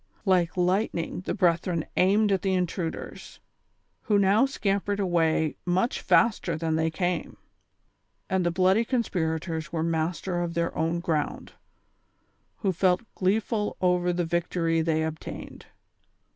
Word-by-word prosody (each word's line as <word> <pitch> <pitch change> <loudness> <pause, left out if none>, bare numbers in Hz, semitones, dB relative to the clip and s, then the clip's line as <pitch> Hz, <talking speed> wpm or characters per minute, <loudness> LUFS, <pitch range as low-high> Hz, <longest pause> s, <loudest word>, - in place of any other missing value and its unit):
Like 185 -3 +2
lightning 180 -1 0
the - - -1
brethren 170 -2 +1
aimed 205 +3 +3
at 190 -2 +1
the 190 -1 +1
intruders, 180 -2 -4 0.6
who 210 -3 +2
now 200 +6 +4
scampered 200 -5 -1
away 165 -4 +1
much 185 +7 0
faster 195 -8 +2
than 160 0 -1
they 160 0 +1
came; 175 0 -2 0.9
and 190 -1 0
the 175 - +2
bloody 190 +5 +3
conspirators 160 - -2
were 160 -1 -1
master 170 +2 -1
of 170 -1 -3
their 170 0 -1
own 165 +2 0
ground, 155 -4 -2 1.1
who 195 -4 +2
felt 185 +4 +2
gleeful 210 +2 0
over 180 -1 +2
the 175 0 -1
victory 165 -1 0
they 160 -1 +1
obtained. 160 0 -7
175 Hz, 130 wpm, -26 LUFS, 165-195 Hz, 1.1 s, now